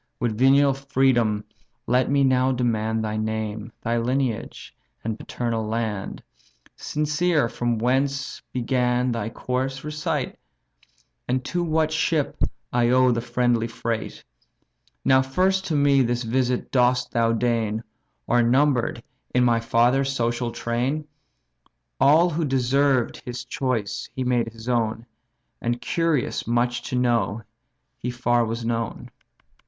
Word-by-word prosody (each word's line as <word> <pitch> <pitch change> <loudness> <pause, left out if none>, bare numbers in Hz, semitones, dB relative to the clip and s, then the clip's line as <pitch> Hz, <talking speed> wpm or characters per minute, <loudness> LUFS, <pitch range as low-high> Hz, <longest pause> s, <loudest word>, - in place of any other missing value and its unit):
With 120 -4 -1
venial 135 +3 +5
freedom 130 -6 +1 0.4
let 125 +1 +2
me 140 0 +3
now 130 0 +3
demand 110 -3 0
Thy 110 0 -2
name, 110 0 -3
thy 115 +1 0
lineage, 125 -1 -2 0.3
and 110 -1 -3
paternal 115 -2 -3
land; 110 -3 -3 0.5
Sincere 150 -1 0
from 120 0 -1
whence 135 +4 0
began 125 0 +1
thy 115 -2 -2
course, 130 +3 -3
recite, 150 -2 -3 0.9
And 130 +1 -1
to 175 +4 -1
what 160 -1 +1
ship 160 -2 0 0.4
I 120 -1 +3
owe 130 0 +5
the 115 -1 0
friendly 120 -1 +1
freight? 115 -1 -4 0.8
Now 130 0 +5
first 185 +8 +1
to 160 - -1
me 140 -1 +4
this 120 0 0
visit 125 +1 -1
dost 125 -1 +2
thou 115 -1 +2
deign, 115 -1 0 0.4
Or 120 0 +3
number'd 125 -1 +2 0.3
in 125 - +4
my 120 -1 +3
father's 120 +4 +2
social 120 -2 -1
train? 125 +7 -2 0.9
All 165 +5 +5
who 165 +2 -1
deserved 135 -1 +2
his 125 -1 -6
choice 125 -5 -2
he 130 - -2
made 120 -2 +1
his 115 0 -10
own, 115 -2 0 0.6
And, 120 +1 -1
curious 165 -9 -1
much 120 +1 +1
to - - -2
know, 120 -3 +1 0.6
he 125 - -3
far 120 -1 +1
was 115 +1 -3
known." 115 -1 -3
125 Hz, 130 wpm, -24 LUFS, 115-135 Hz, 0.9 s, venial